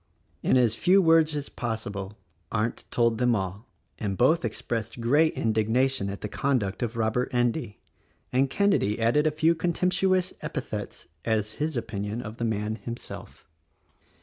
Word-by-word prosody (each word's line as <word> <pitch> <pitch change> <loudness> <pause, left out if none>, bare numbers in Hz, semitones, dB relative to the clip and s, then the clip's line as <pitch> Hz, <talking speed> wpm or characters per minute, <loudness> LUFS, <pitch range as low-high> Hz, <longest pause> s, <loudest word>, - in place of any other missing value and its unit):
In - - +3
as 120 -4 +4
few 185 +10 +4
words 165 -3 +4
as 145 -1 -3
possible 105 -4 -4 0.3
Arndt 115 +1 -1
told 115 -2 +2
them 125 -1 +3
all, 95 +3 -4 0.3
and 100 -3 -2
both 160 +7 +4
expressed 115 0 -3
great 145 +7 +4
indignation 115 +1 +1
at 100 - -6
the - - -3
conduct 110 -5 -1
of 120 -1 -2
Robert 115 +2 0
Endy, 120 -2 0 0.6
and 135 +2 +3
Kenedy 195 - +2
added 120 +7 +3
a - - +5
few 155 +2 +3
contemptuous 180 +2 +1
epithets - - -5 0.2
as 110 -2 0
his 155 -3 0
opinion 105 -1 -3
of 110 +1 -8
the 120 - -1
man 110 0 -1
himself. 115 +3 -9
120 Hz, 150 wpm, -27 LUFS, 110-150 Hz, 0.6 s, a